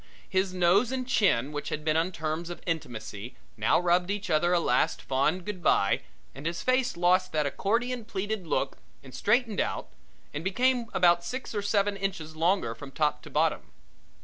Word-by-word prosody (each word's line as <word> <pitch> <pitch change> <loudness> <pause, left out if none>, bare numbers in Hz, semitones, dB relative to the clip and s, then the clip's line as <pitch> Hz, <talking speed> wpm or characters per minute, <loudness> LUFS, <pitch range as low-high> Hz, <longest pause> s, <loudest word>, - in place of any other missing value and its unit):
His 190 0 0
nose 185 +6 +3
and 260 -1 -2
chin 150 - +2
which 145 -1 -4
had 150 0 -4
been 155 -1 +2
on 165 +3 +1
terms 160 0 -3
of 175 - -8
intimacy 120 - -5 0.2
now 110 +6 +3
rubbed 175 +1 +2
each 205 -1 -2
other 165 +3 +3
a 175 - +4
last 125 -6 +1
fond 150 +7 0
good 205 -4 -5
bye 100 -11 +3 0.3
and 140 +4 -6
his 170 0 -3
face 255 -6 +1
lost 185 +1 +3
that 155 -1 +1
accordion 235 - -1
pleated 205 -3 -3
look - - -1 0.2
and - - -13
straightened 240 -5 +1
out - - -3 0.4
and 145 - -4
became 245 +5 +1
about 175 -1 +4
six 255 +8 -5
or 205 - -1
seven 200 0 +1
inches 195 -6 -4
longer 170 -6 +1
from 135 +4 -10
top 150 +2 0
to - - -11
bottom. - - 0
175 Hz, 180 wpm, -28 LUFS, 155-205 Hz, 0.4 s, a